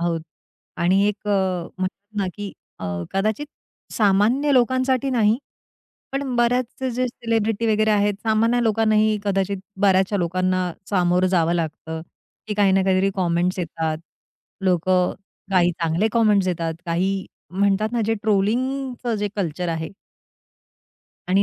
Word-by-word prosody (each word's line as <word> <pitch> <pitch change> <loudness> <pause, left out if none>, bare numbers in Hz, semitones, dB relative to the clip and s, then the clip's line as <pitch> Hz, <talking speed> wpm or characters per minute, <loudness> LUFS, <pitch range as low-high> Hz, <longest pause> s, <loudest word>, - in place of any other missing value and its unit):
आहोत 170 -1 0 0.6
आणि 185 +3 +3
एक 210 0 -4
अ, - - +2 0.5
म्हणतात 200 +3 -5
ना 195 - +1
की 205 -1 -6 0.3
अ, 95 - -6 0.3
कदाचित 215 +8 0 0.5
सामान्य 220 +8 +3
लोकांसाठी 260 +1 +2
नाही. 225 -2 +3 0.7
पण 275 -2 -2
बऱ्याच 245 +2 +1
जे 255 +1 +1
सेलिब्रिटी 225 -1 -1
वगैरे 215 +1 +2
आहेत, 205 0 +2
सामान्य 230 +2 +2
लोकांनाही 215 -1 +3
कदाचित 195 0 0 0.2
बऱ्याचशा 190 0 +3
लोकांना 185 0 0 0.2
सामोरं 180 -1 +3
जावं 170 -2 +2
लागतं 160 -1 -3 0.5
की 210 - -3
काही 200 -2 +3
ना 195 - +3
काहीतरी 190 +1 +2
कमेंट्स 180 0 +1
येतात. 160 -2 -2 0.7
लोकं 180 0 +2 0.4
काही 180 -2 +4
चांगले 165 +6 +1
कमेंट्स 210 -5 +3
येतात. 165 -2 -2
काही 190 +3 0 0.2
म्हणतात 200 +3 +1
ना 240 - 0
जे 225 - +2
ट्रोलिंगचं 245 +4 0
जे 205 0 -1
कल्चर 175 -2 -2
आहे. 160 -1 -3 1.4
आणि 195 +2 +4
200 Hz, 130 wpm, -22 LUFS, 180-225 Hz, 1.4 s, काही